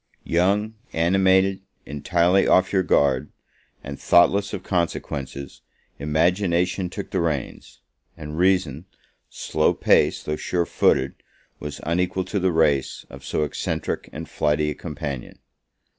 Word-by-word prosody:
Young, 100 +6 +1 0.2
animated, 95 +3 +3 0.2
entirely 85 +6 +2
off 95 +1 +3
your 95 - +4
guard, 70 -5 +1 0.5
and 70 0 -7
thoughtless 100 +4 +4
of - - -5
consequences, 70 -6 -3 0.4
Imagination 90 +4 +1
took - - -7
the - - 0
reins; 75 -6 -4 0.4
and 75 -1 -7
Reason, 90 -4 +1 0.4
slow - - 0
paced, - - +2
though 75 - -1
sure 85 +1 -1
footed, 65 -4 +2 0.5
was 75 0 -7
unequal 90 +3 -1
to 100 +2 -2
the 95 0 +1
race 75 -5 +1
of - - -11
so 75 - -1
eccentric 75 - -3
and - - -7
flighty 75 0 0
a - - -3
companion. 70 -4 -6
85 Hz, 125 wpm, -23 LUFS, 75-95 Hz, 0.5 s, your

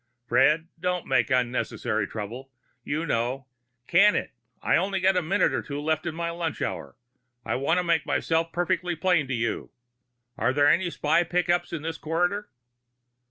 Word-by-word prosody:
"Fred, 150 +6 +3
don't 180 0 -1
make 130 -2 +2
unnecessary 125 -1 0
trouble. 115 +5 -7 0.3
You 155 +5 -2
know 125 0 -1 0.2
" 120 0 -47
"Can 205 +4 +6
it. - - -2 0.3
I've - - +3
only 195 +1 -1
got 190 +1 +3
a 180 - +2
minute 185 +4 +1
or - - 0
two 145 0 -5
left 155 +2 -1
of 160 - -3
my 170 0 -2
lunch 170 -2 -3
hour. - - -4 0.5
I - - -1
want 140 +6 +1
to 180 - +1
make 170 -3 +2
myself 165 0 0
perfectly 175 0 -1
plain 165 -3 +2
with 130 -2 -2
you. 115 0 -2 0.7
Are 120 +3 +2
there 145 +1 +4
any 175 +4 +3
spy 160 +1 +2
pickups 175 0 0
in 165 -3 -4
this 160 0 -4
corridor?" 175 +6 -1
160 Hz, 175 wpm, -26 LUFS, 135-175 Hz, 0.7 s, Can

